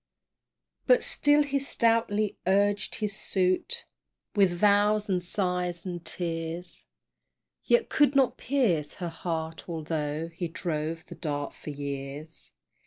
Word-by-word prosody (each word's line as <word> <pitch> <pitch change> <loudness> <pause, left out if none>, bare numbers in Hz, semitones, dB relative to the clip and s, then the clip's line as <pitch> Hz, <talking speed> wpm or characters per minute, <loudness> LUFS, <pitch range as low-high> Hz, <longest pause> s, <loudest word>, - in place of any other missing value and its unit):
But - - +6
still 290 0 +4
he 280 -1 0
stoutly 225 -5 +1
urged 200 +1 +2
his 210 -2 -3
suit 185 -3 0 0.5
With 200 -3 +5
vows, 205 +3 +3
and 180 -1 +1
sighs, 180 -1 +1
and 175 -2 -5
tears, 170 0 -3 0.8
Yet 480 -1 +3
could 290 -2 +3
not 270 -2 +4
pierce 215 - 0
her 175 -3 -4
heart, 165 -1 -4
altho' 155 -1 -3
He 170 +1 -4
drove 165 0 -3
the - - -10
Dart 145 -3 -3
for - - -9
years. 140 +2 -4
180 Hz, 120 wpm, -28 LUFS, 160-210 Hz, 0.8 s, But